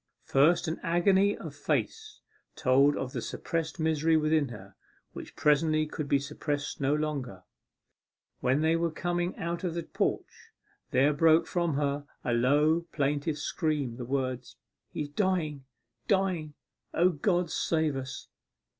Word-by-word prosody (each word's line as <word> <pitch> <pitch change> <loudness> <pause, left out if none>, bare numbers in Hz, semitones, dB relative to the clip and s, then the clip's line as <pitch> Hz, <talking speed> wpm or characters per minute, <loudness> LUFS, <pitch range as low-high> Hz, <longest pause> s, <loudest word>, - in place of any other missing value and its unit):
First, 155 +7 +3
an 160 - -3
agony 190 +4 +3
of - - -8
face 440 -1 -3 0.3
told 135 +3 +3
of 130 -1 -4
the - - -3
suppressed 165 0 -3
misery 160 0 +2
within 155 -1 +2
her, 100 -5 -11 0.4
which - - -9
presently 155 +1 +3
could 155 -1 -5
be 140 - +4
suppressed 145 +1 -4
no 140 +2 +2
longer. 140 -11 -3 1.0
When 130 +4 +1
they 160 +1 +3
were 170 0 +1
coming 175 +2 -2
out 170 +2 -3
of 175 -3 -2
the 170 - -2
porch, - - -3 0.4
there 140 +3 +3
broke 160 +2 +4
from 170 -4 -1
her 145 0 -1 0.2
in 125 - 0
a - - +2
low 150 +7 +3
plaintive 145 +1 -1
scream 145 -6 -2
the 125 - -5
words, 130 -1 -3 0.4
'He's 150 -1 -4
dying 155 -5 -1 0.4
dying! 185 -7 0 0.4
O 175 +2 +4
God, 175 +1 0
save 160 -3 0
us! 135 0 -6
155 Hz, 145 wpm, -29 LUFS, 140-170 Hz, 1.0 s, be